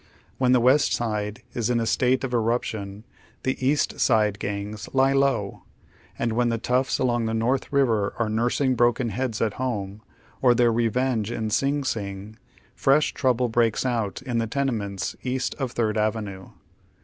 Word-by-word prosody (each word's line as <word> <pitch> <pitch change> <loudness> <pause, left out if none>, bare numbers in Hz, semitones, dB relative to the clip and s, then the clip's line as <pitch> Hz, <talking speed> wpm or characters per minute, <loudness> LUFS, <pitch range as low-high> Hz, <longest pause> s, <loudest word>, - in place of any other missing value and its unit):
When 130 -1 +3
tiie 125 - +4
West 135 +4 +4
Side 105 -2 -2
is 120 -1 -1
in 120 -1 +2
a 115 - 0
state 125 +3 +1
of 130 -2 -3
eruption, 110 -3 -2 0.4
the 130 0 -2
East 145 +3 +1
Side 105 -4 +2
gangs 100 +1 -5
" - - -28
lie 135 0 +4
low," 135 -8 0 0.6
and 115 -1 -1
when 120 +1 +2
tlie 115 -1 -1
toughs 125 +3 +1
along 120 -3 0
the 110 - -1
North 125 +4 0
River 115 -8 +1
are 115 - 0
nursing 120 +5 +1
bi 120 -1 +4
oken 120 -1 0
lieads 115 0 -1
at 105 - -2
home, 105 -5 -3 0.4
or 125 -2 +5
their 120 -1 +3
revenge 115 -1 0
in 110 -2 -3
Sing 140 +4 +1
Sing, 105 -2 -5 0.3
fresh 140 +3 +2
trouble 125 -2 +1
breaks 115 0 +1
out 115 -2 -2
in 120 -3 -1
the 115 - -1
tenements 110 -7 -2
east 130 0 -2
of 130 -3 -3
Third 110 -2 0
Avenue. 105 -3 -2
115 Hz, 175 wpm, -24 LUFS, 110-130 Hz, 0.6 s, or